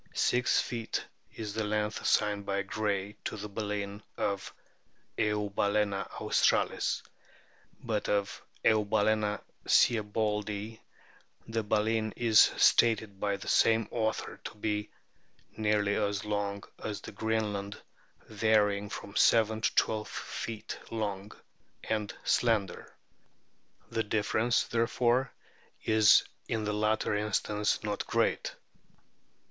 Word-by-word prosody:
Six 125 0 +2
feet 115 -2 -3 0.3
is 105 -3 -5
the 110 - -1
length 105 0 -1
assigned 105 -1 +2
by 100 0 -1
Gray 100 0 -2
to - - -3
the 105 +1 -5
baleen 105 -1 -4 0.2
of 100 -1 -2 0.4
" - - -40
Eubalcena 105 -1 0
australis - - +1 0.4
"; - - -32
but 110 -3 -2
of 100 -1 -1 0.2
"Eubafana 105 -1 +2 0.3
sieboldii" 105 -1 +1 0.7
the 115 0 -1
baleen 110 +1 0
is 115 -2 +4 0.2
stated 110 -4 +3
by 100 -1 0
the - - -10
same 115 -1 +3
author 110 -2 -2
to - - -6
be 105 0 -2 0.3
" - - -38 0.3
nearly 105 -1 +1
as 100 -1 -1
long 100 -1 -2 0.2
as 105 -2 -4
the - - -8
Greenland, 105 -2 -2 0.5
varying 105 -2 +2
from 100 - -8
seven 110 0 +4
to - - 0
twelve 110 -1 +1
feet 110 -2 -6
long, 105 -2 -3 0.5
and 105 -2 -2
slender." 110 -6 +1 1.0
The 115 - 0
difference, 110 +3 +1
therefore, 120 +2 +1 0.5
is 110 -1 +6 0.2
in 110 -1 -1
the 105 0 -1
latter 105 +1 +1
instance 105 0 0
not 105 -1 -3
great. - - 0
105 Hz, 115 wpm, -30 LUFS, 105-110 Hz, 1.0 s, is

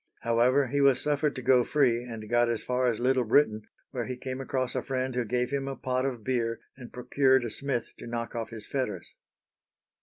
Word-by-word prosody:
However, 120 +4 +3
he 140 +3 0
was 135 -2 +5
suffered 150 0 0
to 130 - -6
go 125 -1 +5
free, 120 -4 +2
and 115 -3 -8
got 120 +1 +3
as 115 -2 -2
far 125 0 0
as 115 -3 0
Little 130 +1 +2
Britain, 110 -3 +2 0.2
where 125 -3 -3
he 125 -1 -4
came 130 +1 -5
across 130 -2 -2
a - - -1
friend 130 -1 -2
who 125 0 0
gave 125 +3 -1
him 140 -1 -2
a 135 - -3
pot 130 +1 -1
of 120 -5 -5
beer 115 -2 -1 0.2
and 125 -2 -11
procured 130 +1 +2
a 115 - -4
smith 135 0 -3
to - - -8
knock 115 0 -4
off 115 -2 -4
his 110 -2 -5
fetters. 105 -10 -3
125 Hz, 215 wpm, -28 LUFS, 115-130 Hz, 0.2 s, was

